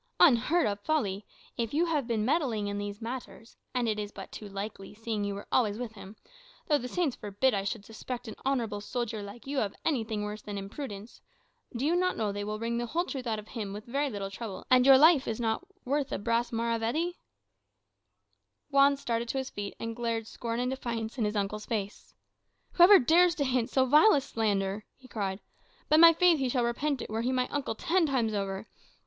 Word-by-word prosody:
"Unheard 300 +2 +5
of 205 -1 -1
folly! 205 -7 -1 0.3
If 235 +2 -2
you 335 +3 +3
have 300 -7 -1
been 220 -3 0
meddling 250 -7 +1
with 205 0 -3
these 205 +1 -5
matters 235 -1 -7 0.2
and 250 -2 0
it 215 -1 0
is 205 -1 -4
but - - -9
too 210 - -8
likely, 195 0 -7
seeing 220 -1 -3
you 200 0 -2
were 200 - -7
always 215 -5 +2
with 240 -2 -5
him 205 -1 -11 0.5
(though, 295 -4 +3
the 250 - -5
Saints 315 -2 -1
forbid 210 +5 0
I 195 -1 0
should 205 +1 -4
suspect 240 +3 -7
an 220 - -5
honourable 235 -6 -1
soldier 230 -1 -3
like 205 +4 -10
you 275 0 -1
of 200 -4 -2
anything 225 -8 -1
worse 210 +1 -5
than 205 -1 -6
imprudence) 205 +1 -7 0.5
do 245 +4 -1
you 330 +3 +2
not 365 +1 +1
know 215 -2 0
they 205 0 -4
will 210 +1 -3
wring 230 +1 -2
the 240 - -2
whole 345 +7 0
truth 260 -7 -5
out 220 -1 0
of 210 0 -9
him 210 -5 -5
with 210 +1 -8
very 280 +4 -1
little 200 -4 -5
trouble, 200 -1 -7
and 255 0 +6
your 270 -1 +9
life 305 -1 +6
is 225 - -2
not 230 +10 -1 0.2
worth 280 +1 -1
a - - -1
brass 230 +3 0
maravedì?" 235 +9 -1 1.5
Juan 280 0 +5
started 235 -3 -2
to 270 - -2
his 265 -1 -3
feet, 205 -1 -5
and 230 0 -4
glared 230 -1 -2
scorn 230 +1 -4
and 250 +1 0
defiance 235 -2 -4
in 220 - +2
his 210 +1 -2
uncle's 210 +1 -2
face. 205 -3 -4 0.6
"Whoever 365 +3 +8
dares 340 +5 +4
to 285 - 0
hint 255 -3 0
so 260 -1 +3
vile 300 - +6
a 280 - +2
slander," 205 -4 -1
he 260 - -16
cried, 200 -4 -3 0.5
"by 310 - +5
my 335 +1 +10
faith 340 -1 +4
he 265 -2 0
shall 245 -1 +1
repent 275 +3 -1
it, - - -9
were 220 +1 -1
he 245 +2 0
my 255 -1 +1
uncle 290 -1 -2
ten 350 -1 +1
times 240 -6 0
over. 195 +1 -3
235 Hz, 215 wpm, -29 LUFS, 210-270 Hz, 1.5 s, my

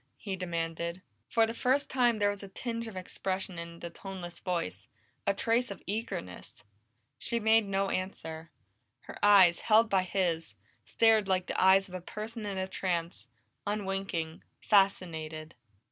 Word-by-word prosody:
he 195 -3 -4
demanded. 170 0 -3 0.3
For 225 -1 +4
the 225 - -4
first 265 +4 +1
time 245 -3 +2
there 205 -1 +3
was 205 - -6
a 200 - -8
tinge 230 +3 -4
of 220 - -8
expression 185 -1 -3
in 170 0 -8
the 170 - -6
toneless 175 -2 -8
voice, 105 - -3 0.4
a 200 - +4
trace 235 +4 +1
of 200 - -8
eagerness. 140 - -5 0.6
She 235 - -2
made 220 -1 +4
no 195 0 0
answer; 165 -4 -4 0.5
her - - -10
eyes, 195 -4 +7
held 220 0 +4
by 190 -1 +4
his, 180 -3 -1 0.3
stared 220 -3 +3
like 185 -1 +1
the - - 0
eyes 190 +1 +6
of 185 - -14
a 185 - -4
person 215 +3 -6
in 195 -1 -3
a 190 - 0
trance, 170 - -3 0.4
unwinking, 195 -5 -2 0.2
fascinated. 165 -6 +1
190 Hz, 155 wpm, -30 LUFS, 170-210 Hz, 0.6 s, eyes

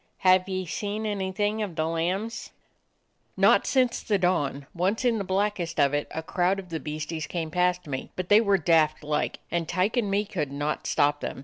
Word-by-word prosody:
"Have 185 +1 +5
ye 185 -1 -2
seen 205 +5 -3
anything 205 +1 -1
of 195 -6 -4
the 160 -1 0
lambs? 180 +8 -2 0.4
" - - -46 0.3
"Not - - +4
since 255 -2 +2
the 210 - +1
dawn. 145 -7 0
Once 190 +8 0
in 230 -3 +2
the - - -2
black 200 +2 0
est 170 -2 -4
of 140 -1 +4
it 145 0 -1
a 160 - -5
crowd 180 +3 +1
of 190 -2 -8
the 165 -1 -3
beasties 155 +1 -4
came 165 -3 -4
past 180 +1 +1
me, 135 -3 -5
but 185 -1 -4
they 205 +3 +6
were 200 -3 +3
daft 155 -2 +2
like, 150 0 -2
and 170 -2 -1
Tyke 185 +7 0
and 220 -4 +1
me 200 +2 +1
could 160 -9 -3
not 145 +2 -3
stop 145 0 +2
them. - - -5
180 Hz, 210 wpm, -26 LUFS, 160-200 Hz, 0.4 s, they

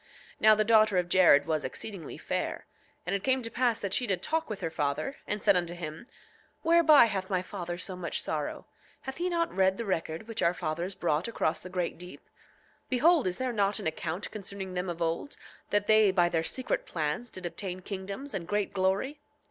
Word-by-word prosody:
8:9 - - -28
Now 215 0 +7
the 215 - +2
daughter 215 -2 +4
of 175 -1 +1
Jared 170 -6 +6
was 155 -2 -1
exceedingly 170 +4 -5
fair. - - -3 0.4
And 180 - -2
it 200 - -3
came 260 -1 +2
to 230 - -5
pass 240 -2 +1
that 195 -2 -2
she 245 +3 +2
did 190 -3 -1
talk 320 -1 0
with 215 - -5
her 165 - -2
father, 150 - -2
and 210 -1 -2
said 200 -2 +5
unto 175 -1 0
him: 165 +5 -7 0.6
Whereby 320 -5 +7
hath 195 -4 -3
my 185 -2 0
father 175 -3 -5
so 185 +1 -5
much 180 -2 -3
sorrow? - - -3 0.4
Hath 265 0 -6
he 355 +2 -1
not 335 -1 -1
read 190 0 +3
the 230 - -3
record 165 0 -2
which 225 -1 -4
our 170 +1 +3
fathers 170 +5 -3
brought 160 +1 0
across 160 -8 0
the 185 - -9
great 180 -2 -2
deep? 180 0 -11 0.6
Behold, 295 - +4
is 180 - -2
there 255 -1 -2
not 200 -2 +1
an - - -6
account 160 +3 -3
concerning 200 -2 -6
them 180 0 -2
of 170 0 -2
old, 165 - -2 0.3
that 205 0 +1
they 215 -1 +5
by 175 -2 +3
their 165 -1 +1
secret 255 +9 -2
plans 160 +9 -2
did 185 -1 -7
obtain 180 +2 -5
kingdoms 200 +8 -6
and 175 -4 -4
great 205 +1 -1
glory? 195 +10 0
190 Hz, 210 wpm, -29 LUFS, 175-225 Hz, 0.6 s, Now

